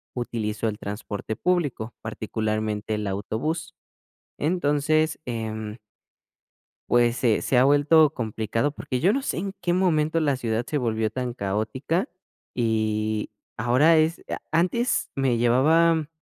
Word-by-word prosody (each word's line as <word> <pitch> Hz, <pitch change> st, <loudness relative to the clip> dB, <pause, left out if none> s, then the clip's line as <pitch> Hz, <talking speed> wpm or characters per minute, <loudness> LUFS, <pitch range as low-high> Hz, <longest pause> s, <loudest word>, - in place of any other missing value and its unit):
utilizo 115 Hz, -3 st, -2 dB
el 105 Hz, -1 st, -3 dB
transporte 105 Hz, +1 st, -5 dB
público, 145 Hz, -11 st, -1 dB
particularmente 110 Hz, -1 st, -2 dB
el 105 Hz, -1 st, -3 dB
autobús. 155 Hz, -, -3 dB, 0.6 s
Entonces, 155 Hz, -1 st, +1 dB
em. 110 Hz, -2 st, -4 dB, 1.1 s
Pues 120 Hz, 0 st, +4 dB
se 115 Hz, -4 st, +2 dB
se 125 Hz, -, +2 dB
ha 125 Hz, -, +6 dB
vuelto 145 Hz, +3 st, +5 dB
complicado, 115 Hz, +3 st, -1 dB
porque 130 Hz, -3 st, -4 dB
yo 180 Hz, +10 st, +3 dB
no 275 Hz, -, 0 dB
sé 275 Hz, -, -3 dB
en 195 Hz, +3 st, -3 dB
qué 175 Hz, 0 st, 0 dB
momento 165 Hz, -3 st, +2 dB
la 145 Hz, -4 st, +1 dB
ciudad 115 Hz, -2 st, -1 dB
se 150 Hz, -, -1 dB
volvió 110 Hz, -3 st, 0 dB
tan 125 Hz, +1 st, -3 dB
caótica, 120 Hz, -, -1 dB, 0.5 s
y 110 Hz, -2 st, 0 dB, 0.3 s
ahora 145 Hz, +8 st, +4 dB
es 160 Hz, +2 st, +1 dB
a -, -, -3 dB
antes 185 Hz, +10 st, +1 dB
me 135 Hz, -3 st, +1 dB
llevaba 155 Hz, +7 st, +3 dB
125 Hz, 130 wpm, -25 LUFS, 110-155 Hz, 1.1 s, ha